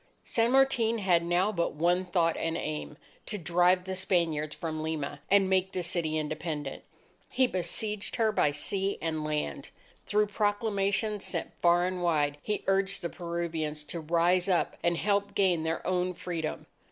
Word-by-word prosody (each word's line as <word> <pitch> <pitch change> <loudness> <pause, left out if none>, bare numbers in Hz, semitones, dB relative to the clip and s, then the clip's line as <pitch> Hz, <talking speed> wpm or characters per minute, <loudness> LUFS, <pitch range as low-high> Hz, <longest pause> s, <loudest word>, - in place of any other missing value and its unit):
San 230 0 +1
Martin 250 -4 +3
had 180 -5 +2
now 175 +4 +2
but 170 -7 -1
one 175 +4 +2
thought 170 -2 +1
and 165 0 -2
aim 75 -1 -4 0.3
to 210 - -3
drive 180 +1 +3
the 190 +1 -4
Spaniards 165 -5 0
from 155 -2 -4
Lima, 150 -3 -3
and 195 -1 +5
make 190 0 +1
the 180 - -2
city 165 -2 -1
independent. 155 -2 -4 0.5
He 260 - +3
besieged 205 +1 -2
her 225 -3 +2
by 150 -7 +2
sea 195 +7 -1
and 160 -2 -2
land. 150 - -3 0.4
Through 210 0 +3
proclamations 205 0 0
sent 170 - -3
far 175 0 +4
and 185 0 -2
wide, 150 -4 +1
he 210 +4 -2
urged 195 0 +1
the 170 - -1
Peruvians 165 -3 -3
to 170 - -4
rise 175 +4 +2
up 180 -2 +1
and 170 0 +1
help 200 +2 0
gain 185 -4 +3
their 165 +1 -2
own 180 0 0
Freedom. 170 -3 -4
175 Hz, 165 wpm, -29 LUFS, 160-195 Hz, 0.5 s, and